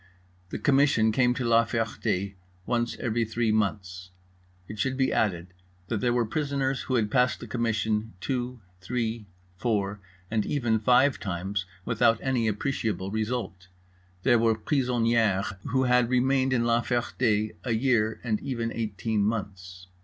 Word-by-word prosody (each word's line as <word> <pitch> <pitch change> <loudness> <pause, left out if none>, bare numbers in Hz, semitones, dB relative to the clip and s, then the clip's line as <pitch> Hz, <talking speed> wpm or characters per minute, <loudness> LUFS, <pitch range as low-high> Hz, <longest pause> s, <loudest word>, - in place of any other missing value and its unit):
The - - -4
Commission 135 -6 +3
came 125 +2 +2
to 125 - -2
La 115 0 +5
Ferté 105 -4 -2 0.3
once 120 -1 -1
every 115 0 0
three 115 0 0
months. 95 -4 -2 0.6
It 105 - -8
should 130 +3 0
be 130 -1 +1
added 90 -4 -1 0.4
that 110 -4 -1
there 120 - +2
were 120 -1 +2
prisoners 140 +1 -1
who 130 - -2
had 105 -3 +1
passed 125 0 +2
the - - -8
Commission, 110 -2 -1
two, 125 0 -3 0.2
three, 115 +1 -3 0.3
four, 105 -2 -1 0.3
and 110 -1 +1
even 120 -6 0
five 125 +5 +4
times, 95 +1 -3 0.2
without 115 - +3
any 125 -4 +1
appreciable 105 -4 -2
result; 110 -4 -3 0.6
there 120 - +4
were 115 -1 +3
prisonnierès 115 -6 +1
who 130 +2 +1
had 125 -1 +3
remained 130 +1 +2
in 120 -2 +2
La 120 0 +3
Ferté 120 -3 0
a 120 - -1
year, 110 -2 +1
and 110 -4 0
even 115 -4 -3
eighteen 110 -1 -2
months. 95 -4 -4
115 Hz, 145 wpm, -27 LUFS, 105-125 Hz, 0.6 s, La